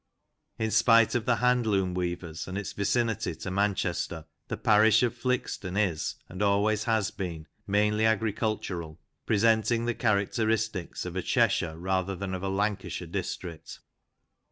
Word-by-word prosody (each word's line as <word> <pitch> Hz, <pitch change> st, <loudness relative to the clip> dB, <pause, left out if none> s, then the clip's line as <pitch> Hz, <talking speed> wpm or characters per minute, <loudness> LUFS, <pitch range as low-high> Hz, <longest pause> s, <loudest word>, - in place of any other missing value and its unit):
In 110 Hz, -1 st, -1 dB
spite 115 Hz, 0 st, +5 dB
of 120 Hz, -2 st, 0 dB
the 120 Hz, -, +4 dB
hand 125 Hz, -1 st, +2 dB
loom 95 Hz, -3 st, +1 dB
weavers 85 Hz, -2 st, -4 dB
and 95 Hz, +1 st, -4 dB
its 105 Hz, -, -4 dB
vicinity 115 Hz, +2 st, 0 dB
to 90 Hz, -, -6 dB
Manchester, 95 Hz, -4 st, -1 dB, 0.2 s
the -, -, -4 dB
parish 110 Hz, +1 st, +5 dB
of 120 Hz, -, +1 dB
Flixton 120 Hz, -7 st, -2 dB
is, 95 Hz, -7 st, 0 dB
and 90 Hz, +2 st, -7 dB
always 105 Hz, +1 st, +2 dB
has 110 Hz, -3 st, +1 dB
been, 85 Hz, -5 st, -5 dB, 0.2 s
mainly 105 Hz, +2 st, +2 dB
agricultural, 105 Hz, -7 st, -2 dB, 0.3 s
presenting 115 Hz, +2 st, +2 dB
the 120 Hz, -, 0 dB
characteristics 110 Hz, -2 st, 0 dB
of -, -, -6 dB
a -, -, 0 dB
Cheshire 80 Hz, -2 st, +1 dB
rather 95 Hz, +2 st, -1 dB
than 95 Hz, 0 st, -4 dB
of 95 Hz, -, -3 dB
a 95 Hz, -, -2 dB
Lancashire 100 Hz, 0 st, -2 dB
district. 85 Hz, -3 st, -6 dB
105 Hz, 145 wpm, -28 LUFS, 95-110 Hz, 0.3 s, spite